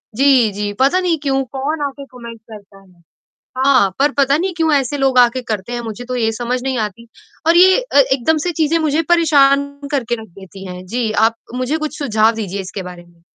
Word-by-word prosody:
जी, 260 -3 +4
जी, 205 +1 -4
पता 275 +8 +3
नहीं 355 -3 0
क्यों? 270 -1 0
कौन 275 +5 -4
आके 280 0 -10
कमेंट 235 -2 -10
करता 200 -2 -13
है। 180 -3 -24 0.6
हाँ, 260 -6 +3
पर 285 +2 +3
पता 280 0 +3
नहीं 370 +3 -2
क्यों 325 -1 +1
ऐसे 280 0 0
लोग 270 -2 +1
आके 245 +1 +3
करते 220 -1 -5
हैं, 240 - -3
मुझे 230 +1 -7
तो 255 +1 -4
ये 225 -2 0
समझ 245 +2 -3
नहीं 265 -1 -2
आती 215 +2 -5 0.4
और 335 - +5
ये 375 +1 +6
अ, - - -2
एकदम 275 +2 +3
से 355 - 0
चीज़ें 325 -1 0
मुझे 310 0 +1
परेशान 285 -5 +4 0.3
करके 245 -5 -1
रख 220 - -12
देती 190 0 -12
हैं। 180 0 -9
जी, 225 +3 -2
आप 220 +2 +2 0.2
मुझे 255 +5 -1
कुछ 310 -1 -5
सुझाव 220 -6 +2
दीजिए 200 -3 -4
इसके 190 +1 -7
बारे 180 -1 -10
में। 170 -1 -25
255 Hz, 210 wpm, -17 LUFS, 215-285 Hz, 0.6 s, ये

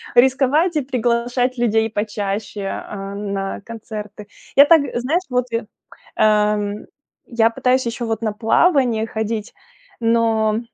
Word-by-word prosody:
Рисковать 270 +7 +3
и - - +2
приглашать 245 0 0
людей 225 -2 +1
почаще, 205 -1 -3
э, 195 0 -5
на 200 -1 -4
концерты. 210 -2 -8 0.3
Я 280 - +9
так 325 0 +6
знаешь, 270 +9 0
вот 250 -1 0
я 230 -1 -2 0.5
Эм, 210 -1 +1 0.4
я 230 -1 +2
пытаюсь 250 +3 +1
ещё 235 +1 -3
вот 225 -1 -2
на 215 -2 -1
плавание 230 - +2
ходить, 220 -1 -4 0.5
но 225 -2 +2
225 Hz, 125 wpm, -20 LUFS, 210-250 Hz, 0.5 s, Я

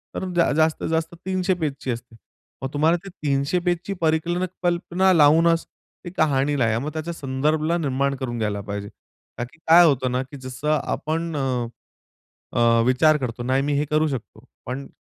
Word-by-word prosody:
तर - - -3 0.3
जास्तीत 155 0 +1
जास्त 160 +1 -1
300 185 0 +1
पेजची 145 -6 -3
असते. 120 0 -7 0.5
मग 135 - -2
तुम्हाला 155 +4 +3
ते - - -7
300 145 0 -1
पेजची 175 +2 -1
परिक 160 0 +1 0.4
कल्पना 175 +2 +2
लावूनच 165 +1 +5 0.4
ती - - -4
कहाणी 145 -2 +2
लिहा. 115 -2 +2
मग 145 +5 -4
त्याच्या 160 +2 -4
संदर्भाला 155 +3 0
निर्माण 140 -3 0
करून 125 -3 -4
घ्यायला 105 -2 -1
पाहिजे. 100 0 -5 0.5
का - - -2
की 125 +7 -11
काय 170 +2 +8
होतं 130 -5 +2
ना 125 +1 0
की 135 +2 -11
जसं 130 +3 -3
आपण, 165 +1 -2
अ, 130 -4 -1 0.9
अ, 115 0 +4
विचार 150 +5 +4
करतो, 125 -4 -4
नाही 130 +2 +1
मी 145 - -1
हे 145 - +1
करू 155 +1 +3
शकतो 120 -4 -6 0.2
पण 135 +2 -5
145 Hz, 170 wpm, -23 LUFS, 130-160 Hz, 0.9 s, काय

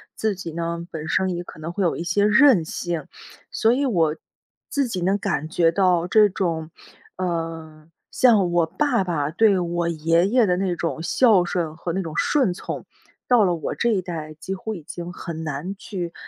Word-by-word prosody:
自 220 -1 0
己 175 -4 -7
呢， 170 0 -4
本 160 0 -6
身 185 0 +1
也 175 - -4
可 155 - -12
能 165 +2 -6
会 200 - -1
有 170 - +1
一 170 - -4
些 200 +4 +2
任 215 - +6
性， 165 -1 -4 0.5
所 225 +1 +3
以 280 +2 0
我， 165 -10 +1 0.5
自 280 -2 0
己 190 -6 -4
能 190 +3 +2
感 175 -6 -2
觉 165 0 +3
到， 180 -3 +2
这 210 +1 +5
种， 165 -5 -2 0.5
呃， 165 -3 -4 0.2
像 210 -8 +4
我 170 -1 +3
爸 235 - +1
爸 150 -5 -1
对 200 +1 +4
我 170 0 -1
爷 165 +2 +2
爷 240 -1 +4
的 180 -1 +1
那 185 -2 -1
种 165 -1 -3
孝 195 +1 +4
顺 165 -3 -2
和 170 +1 -4
那 190 - -1
种 160 -3 -7
顺 260 -11 +2
从， - - -6 0.4
到 245 -4 +5
了 175 - +1
我 160 - -4
这 235 - +1
一 205 -5 +1
代 160 -4 -6
几 175 +5 -6
乎 220 +3 -5
已 170 - -9
经 175 +3 -7
很 165 -2 -6
难 155 +6 -4
去 180 -5 -6
175 Hz, 210 characters per minute, -23 LUFS, 165-200 Hz, 0.5 s, 任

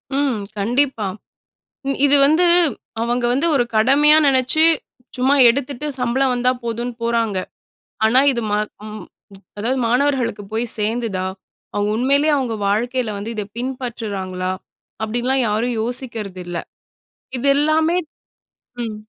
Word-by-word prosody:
ம். 275 -7 0 0.2
கண்டிப்பா. 240 +1 0 0.8
இ - - +2
இது 285 - +5
வந்து, 315 +5 +4 0.6
அவங்க 240 +1 0
வந்து 285 +7 +1
ஒரு 245 - +3
கடமையா 280 +7 +5
நெனச்சு, 265 +3 +2 0.5
சும்மா 265 +3 +3
எடுத்துட்டு, 280 +2 -2
சம்பளம் 255 +2 +1
வந்தா 250 +1 +2
போதுன்னு 235 +1 -3
போறாங்க. 230 -4 0 0.7
ஆனா, 250 +4 +5
இது. 235 -2 -3
ம - - +2 0.3
ம் 215 -2 -8 0.6
அதாவது, 245 +5 -1
மாணவர்களுக்கு 250 -4 +1
போய் 225 +2 0
சேர்ந்துதா? 215 -3 -1 0.5
அவங்க 205 0 0
உண்மயிலயே, 280 +5 +2
அவங்க 245 -4 -2
வாழ்க்கையில 240 +2 0
வந்து, 220 +3 -5
இத 210 - -2
பின்பற்றுறாங்களா? 215 -8 -4 0.5
அப்படின்லாம் 245 +4 0
யாரும் 230 +3 -1
யோசிக்கிறது 230 -6 -4
இல்ல. 175 -1 -4 0.8
இது 250 - -3
எல்லாமே 315 +3 +2 0.9
ம். 220 -2 -4
245 Hz, 120 wpm, -20 LUFS, 220-270 Hz, 0.9 s, இது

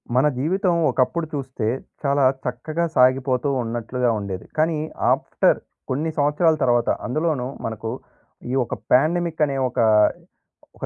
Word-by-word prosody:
మన 130 +4 +4
జీవితం 180 - +1 0.2
ఒకప్పుడు 160 +6 0
చూస్తే 130 -6 -3 0.4
చాలా 140 0 +2 0.2
చక్కగా 155 +7 -2
సాగిపోతూ 130 +1 +3
ఉన్నట్లుగా 120 +2 -2
ఉండేది. 95 -2 -5
కానీ 160 +1 +2 0.3
ఆఫ్టర్ - - +2 0.3
కొన్ని 150 +5 -1
సంవత్సరాల 150 +3 +3
తర్వాత 120 -2 +2 0.2
అందులోను 150 0 -1 0.2
మనకు 110 0 -4 0.6
ఈ - - -2
ఒక - - -6 0.2
ప్యాండమిక్ 160 +4 +2
అనే 140 -2 -3
ఒక - - -5 1.0
ఒక - - -5
135 Hz, 120 wpm, -22 LUFS, 125-155 Hz, 1.0 s, మన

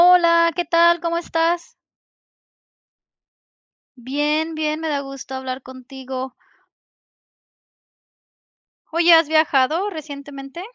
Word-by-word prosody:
Hola, 335 -2 +5
¿qué 350 0 -1
tal? 340 0 +4
¿Cómo 335 0 -2
estás? 335 0 -1 2.2
Bien, 295 +5 -2
bien, 310 0 -2
me 325 - -3
da 290 -2 -1
gusto 275 -1 -9
hablar 260 0 -5
contigo. 260 0 -8 2.6
Oye, 335 +1 +5
¿has 325 -1 +6
viajado 315 +4 +2
recientemente? 285 -2 -9
310 Hz, 90 wpm, -20 LUFS, 270-335 Hz, 2.6 s, has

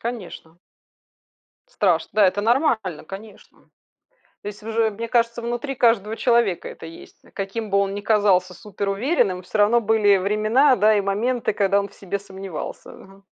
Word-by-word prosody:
конечно. 185 -8 -7 1.1
Страшно. 180 - 0
Да, 210 -1 +4
это 190 +2 0
нормально, 225 - 0
конечно. 200 +5 -13 0.8
То - - -7
есть 210 +1 -8
уже, 225 0 0
мне 230 +3 -6
кажется, 235 0 0
внутри 240 +4 -4
каждого 225 -3 +2
человека 235 -8 +1
это - - -11
есть. 165 - -13 0.2
Каким 205 +2 -5
бы 200 - +3
он 195 0 0
ни 205 - -5
казался 200 -4 +2
суперуверенным, 200 - -1
всё 200 +4 -5
равно 220 +3 +4
были 210 -2 +3
времена, 215 +8 +3
да 215 -1 +4
и 205 - +2
моменты, 215 +4 -1
когда 200 0 +2
он 200 -1 -4
в - - -22
себе 200 +1 -4
сомневался, 190 -4 -8
ага. 195 +1 -16
210 Hz, 155 wpm, -22 LUFS, 195-230 Hz, 1.1 s, Да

